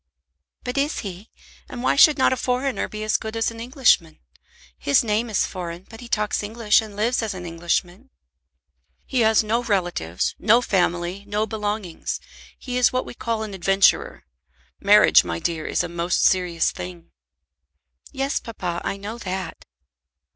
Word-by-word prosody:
"But 250 +2 -2
is 290 +2 -1
he? 195 0 -8 0.4
And 250 -3 -7
why - - +2
should 295 +1 +7
not 260 - +3
a - - 0
foreigner 255 +1 -1
be 215 0 -6
as 215 - +2
good 220 0 -7
as 225 0 0
an 230 - -10
Englishman? 235 - +2 0.6
His 140 - +2
name 225 +1 0
is 210 - +1
foreign, 175 -1 -7
but 225 +1 -12
he 240 - -9
talks 210 -2 0
English 215 +1 +2
and 215 -2 -10
lives 230 +5 +1
as 220 -3 -3
an 180 -1 -7
Englishman." 175 +7 -2 1.0
"He 260 - -1
has 220 -1 +4
no 225 +3 0
relatives, 175 - -1
no 225 +3 +5
family, 180 -3 -1
no 210 +1 0
belongings. 210 -4 -4 0.4
He 250 -1 -4
is 250 - +4
what 255 0 -1
we - - -8
call 230 -2 -3
an 210 -2 -6
adventurer. 195 +1 +2 0.5
Marriage, 210 +1 +6
my 85 -1 -3
dear, 160 - -3
is - - 0
a - - -3
most 170 +1 -1
serious 180 -3 +2
thing." 90 -2 -9 1.0
"Yes, 270 +1 -1
papa, 180 -7 -5
I 195 - -2
know 210 +4 -7
that." 185 -4 -5
210 Hz, 165 wpm, -23 LUFS, 175-235 Hz, 1.0 s, should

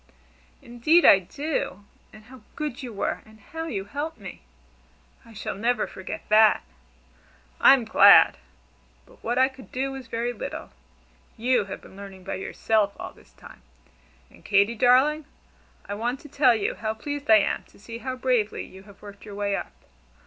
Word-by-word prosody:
"Indeed 240 +9 +3
I 195 - +8
do! 205 - -4 0.3
And 215 0 -15
how 250 +2 -15
good 295 -3 -4
you 250 -3 -7
were, 200 - -3
and 220 0 -19
how 325 +10 -7
you 195 -10 -4
helped 290 +8 -5
me! 195 -4 -10 0.8
I 230 - -16
shall 210 - -5
never 230 +2 0
forget 190 - -8
that." 215 0 +5 1.0
"I'm 265 -4 +6
glad! 220 - +7 0.7
But - - -22
what 240 +2 -2
I 260 0 +5
could 265 -1 -14
do 270 +1 -2
was 265 -2 -8
very 230 +1 -3
little. 225 - -7 0.7
You 240 -2 +1
have 195 - -8
been - - -16
learning 195 -1 -11
by - - -5
yourself 205 +1 -1
all - - -7
this - - -22
time. - - -15 0.7
And - - -20
Katy, 200 +2 +3
darling, 260 +6 +3 0.6
I 200 - -5
want 240 +5 -3
to 295 - -13
tell 265 -4 +4
you 215 - -1
how 220 0 -4
pleased 290 +4 -6
I 220 - +8
am 205 - 0
to - - -22
see 230 +3 -9
how 260 +1 -4
bravely 250 -4 -1
you 190 - -14
have 200 - -18
worked 200 -1 -12
your 205 -2 -10
way 200 -1 -1
up. - - -5
230 Hz, 175 wpm, -25 LUFS, 205-260 Hz, 1.0 s, I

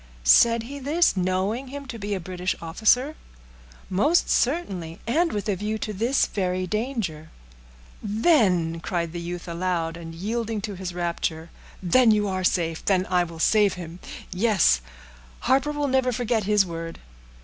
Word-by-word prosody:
"Said 230 - +5
he 280 +4 -7
this, 300 +3 +2
knowing 190 +7 -1
him 280 +2 -7
to 235 -3 -7
be 205 0 -2
a - - -3
British 180 +1 -3
officer?" 225 - +2 0.7
"Most 290 - +2
certainly; 195 - -1
and 325 +8 +1
with 205 +1 -3
a 205 - +1
view 210 +3 -3
to 215 0 -4
this 235 +7 +2
very 185 -2 -2
danger." 210 - -3 0.7
"Then," 205 - +2
cried 170 -1 -3
the 175 - -4
youth 175 +1 -6
aloud, 170 -1 -2
and 165 -1 -9
yielding 220 +4 -2
to 205 +1 -4
his 185 -2 -6
rapture, 170 -2 -3 0.3
"then 230 +7 +5
you 210 -1 +3
are 185 -1 -2
safe—then 180 +2 +1
will 175 -2 +1
I - - -10
save 205 +4 +3
him; 175 -1 -8 0.3
yes, 185 - +3 0.6
Harper 270 +3 +2
will 295 -1 -1
never 260 -1 +2
forget 235 -3 -1
his 210 -1 +3
word." 165 -1 -6
195 Hz, 155 wpm, -25 LUFS, 175-235 Hz, 0.7 s, Said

